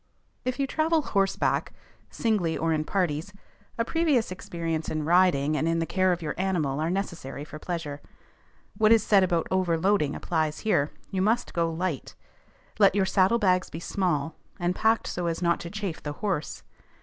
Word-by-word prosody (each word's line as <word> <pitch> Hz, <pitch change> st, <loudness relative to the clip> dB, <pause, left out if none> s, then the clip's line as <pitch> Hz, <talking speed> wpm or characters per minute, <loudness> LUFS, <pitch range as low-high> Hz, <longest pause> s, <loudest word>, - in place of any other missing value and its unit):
If 255 Hz, 0 st, -1 dB
you 275 Hz, -, +2 dB
travel 315 Hz, +3 st, +1 dB
horseback, 195 Hz, -5 st, 0 dB, 0.4 s
singly 200 Hz, -8 st, 0 dB
or 165 Hz, 0 st, +1 dB
in 155 Hz, 0 st, -1 dB
parties, 180 Hz, 0 st, -1 dB, 0.4 s
a 230 Hz, -, +1 dB
previous 295 Hz, -, +1 dB
experience 165 Hz, -3 st, -3 dB
in 155 Hz, -1 st, -2 dB
riding 165 Hz, -4 st, +3 dB
and 155 Hz, -, 0 dB
in 165 Hz, 0 st, +1 dB
the 165 Hz, -, 0 dB
care 185 Hz, +2 st, +2 dB
of 175 Hz, -1 st, -2 dB
your 150 Hz, -, -2 dB
animal 165 Hz, -8 st, 0 dB
are 160 Hz, +2 st, 0 dB
necessary 170 Hz, -7 st, -4 dB
for 155 Hz, 0 st, -9 dB
pleasure. 155 Hz, -4 st, -5 dB, 0.7 s
What 215 Hz, -1 st, +4 dB
is 225 Hz, -2 st, +6 dB
said 200 Hz, -3 st, +5 dB
about 175 Hz, -3 st, +1 dB
overloading 185 Hz, -3 st, +1 dB
applies 155 Hz, -2 st, -1 dB
here: 150 Hz, -9 st, +2 dB, 0.2 s
you 190 Hz, -2 st, -1 dB
must 220 Hz, +5 st, +1 dB
go 165 Hz, -1 st, +1 dB
light; 165 Hz, -4 st, -3 dB, 0.6 s
let 200 Hz, -2 st, +5 dB
your 195 Hz, -2 st, +3 dB
saddlebags 190 Hz, -1 st, +2 dB
be 160 Hz, -, -6 dB
small, 170 Hz, -5 st, -1 dB, 0.3 s
and 175 Hz, +1 st, 0 dB
packed 225 Hz, +3 st, +2 dB
so 175 Hz, -1 st, -3 dB
as 165 Hz, -1 st, -1 dB
not 170 Hz, -1 st, +1 dB
to 170 Hz, -, -6 dB
chafe 200 Hz, -4 st, -4 dB
the 145 Hz, -, -4 dB
horse. 180 Hz, -3 st, -3 dB
175 Hz, 175 wpm, -27 LUFS, 160-200 Hz, 0.7 s, is